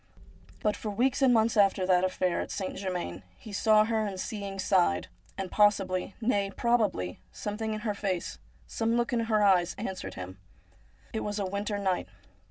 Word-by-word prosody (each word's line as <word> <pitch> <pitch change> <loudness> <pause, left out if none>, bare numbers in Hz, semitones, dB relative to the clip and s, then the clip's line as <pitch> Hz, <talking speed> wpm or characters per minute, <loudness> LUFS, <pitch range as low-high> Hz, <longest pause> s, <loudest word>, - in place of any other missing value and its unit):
But 210 -1 +1
for 215 - -5
weeks 250 +6 +1
and 265 -2 +6
months 225 -1 +3
after 195 -2 +4
that 185 -1 +4
affair 185 -1 0
at - - -5
St. 190 - -4
Germain 180 - -4 0.2
he 215 - -11
saw 215 +1 +5
her, 220 -1 0
and 195 -3 -4
seeing 200 -1 -4
sighed. 85 - +2 0.3
And 190 -2 -4
possibly, 195 -3 +2
nay 205 -4 +1
probably, 205 - 0
something 215 +1 -4
in 215 - -5
her 210 -1 -1
face, 195 -3 -3 0.3
some 225 - 0
look 240 +1 0
in 230 -1 +1
her 215 -2 +2
eyes, 185 -3 +4
answered 190 -4 -5
him. 95 +1 -8 0.7
It 220 - -1
was 210 -1 -3
a 200 - -1
winter 205 +2 -2
night. 190 -3 0
200 Hz, 180 wpm, -29 LUFS, 185-220 Hz, 0.7 s, and